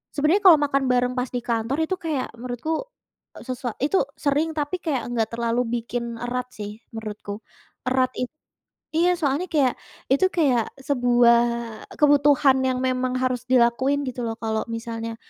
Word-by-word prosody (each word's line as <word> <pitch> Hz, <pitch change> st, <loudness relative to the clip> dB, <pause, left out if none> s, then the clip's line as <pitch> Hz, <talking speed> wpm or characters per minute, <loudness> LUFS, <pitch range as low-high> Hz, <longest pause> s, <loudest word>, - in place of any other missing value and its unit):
Sebenarnya 315 Hz, +8 st, +2 dB
kalau 325 Hz, -5 st, +9 dB
makan 275 Hz, -1 st, +1 dB
bareng 250 Hz, 0 st, +2 dB
pas 250 Hz, 0 st, -2 dB
di 245 Hz, -, -1 dB
kantor 235 Hz, +3 st, -1 dB
itu 375 Hz, -, 0 dB
kayak 305 Hz, -6 st, -2 dB
menurutku, 255 Hz, -, -3 dB, 0.6 s
eee, -, -, -11 dB
sesua 250 Hz, -2 st, -3 dB
itu 300 Hz, +9 st, +2 dB, 0.2 s
sering 295 Hz, +3 st, +1 dB
tapi 295 Hz, +5 st, -1 dB
kayak 275 Hz, -8 st, -1 dB
enggak 230 Hz, -2 st, -1 dB
terlalu 235 Hz, +1 st, +1 dB, 0.2 s
bikin 235 Hz, 0 st, -4 dB
erat 250 Hz, +1 st, -3 dB
sih 210 Hz, 0 st, -7 dB, 0.2 s
menurutku. 210 Hz, -2 st, -6 dB, 0.5 s
Erat 255 Hz, 0 st, +2 dB
it 250 Hz, -, -1 dB, 0.7 s
iya 350 Hz, +2 st, +4 dB
soalnya 290 Hz, +2 st, 0 dB
kayak 275 Hz, -5 st, +3 dB, 0.4 s
itu 280 Hz, +8 st, +4 dB
kayak 260 Hz, -9 st, +1 dB
sebuah 245 Hz, -3 st, +4 dB, 0.6 s
kebutuhan 285 Hz, -2 st, +5 dB
yang 260 Hz, -1 st, +1 dB
memang 255 Hz, 0 st, 0 dB
harus 255 Hz, -1 st, -1 dB
dilakuin 260 Hz, +3 st, +3 dB
gitu 245 Hz, 0 st, -5 dB
loh. 225 Hz, 0 st, -3 dB
Kalau 220 Hz, -1 st, -1 dB
misalnya 230 Hz, 0 st, -5 dB
255 Hz, 155 wpm, -24 LUFS, 235-285 Hz, 0.7 s, kalau